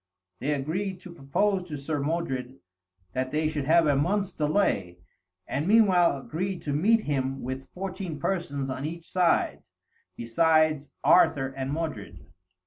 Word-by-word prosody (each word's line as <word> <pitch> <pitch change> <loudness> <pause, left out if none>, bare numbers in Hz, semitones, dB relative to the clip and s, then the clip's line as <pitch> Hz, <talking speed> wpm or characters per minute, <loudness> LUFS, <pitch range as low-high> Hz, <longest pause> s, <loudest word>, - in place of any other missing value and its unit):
They 145 - -1
agreed 180 +7 -3
to 180 - -10
propose 180 +6 0
to 150 -3 -5
Sir 145 +2 -3
Modred 135 -4 -2 0.6
that 130 0 -2
they 155 +1 +1
should 150 -3 -2
have 165 +2 +5
a 145 -2 +3
month's 195 +7 0
delay, 150 - 0 0.5
and 145 +5 -2
meanwhile 190 -8 +5
agreed 175 +7 -4
to 145 - -2
meet 215 +10 +3
him 135 -5 -2
with 130 +1 -5
fourteen 185 -3 -5
persons 145 -6 -2
on 130 0 -4
each 165 +2 -6
side, 180 -2 +1 0.5
besides 155 +4 +2
Arthur 135 -6 +4
and 135 0 -4
Modred. 110 - -5
155 Hz, 140 wpm, -27 LUFS, 135-180 Hz, 0.6 s, have